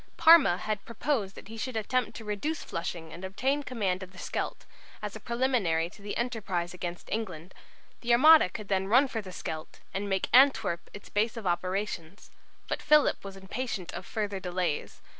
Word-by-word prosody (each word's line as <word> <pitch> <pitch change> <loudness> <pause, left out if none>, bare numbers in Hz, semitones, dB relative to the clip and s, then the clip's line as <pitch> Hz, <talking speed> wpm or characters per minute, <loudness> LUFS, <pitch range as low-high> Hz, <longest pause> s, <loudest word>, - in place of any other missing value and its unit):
Parma 315 - +7
had 210 0 -3
proposed 230 -4 -2
that - - -11
he 225 +1 -9
should 250 +1 -3
attempt 245 +3 0
to 225 - -8
reduce 250 +10 -2
Flushing 165 -1 -5
and 175 - -9
obtain 260 +10 0
command 205 -9 -1
of 190 0 -9
the - - -15
Scheldt, - - -4 0.3
as - - -5
a - - -6
preliminary 235 -10 +1
to 205 - -16
the 205 0 -4
enterprise 200 -8 -2
against 175 -1 -6
England. 185 -6 -4 0.5
The 240 - -1
Armada 305 - +8
could 210 +2 -7
then 190 -1 0
run 255 +7 +5
for 225 -3 -3
the 190 -3 -9
Scheldt, 155 -3 -6
and 200 +1 -2
make 190 -1 0
Antwerp 225 -9 +4
its 205 - -11
base 220 +3 0
of 225 - -6
operations. 185 0 -2 0.4
But - - -2
Philip 300 -1 +4
was 195 -1 -8
impatient 190 -2 -4
of - - -7
further 205 -3 -2
delays. 180 -4 -3
200 Hz, 180 wpm, -29 LUFS, 185-235 Hz, 0.5 s, Armada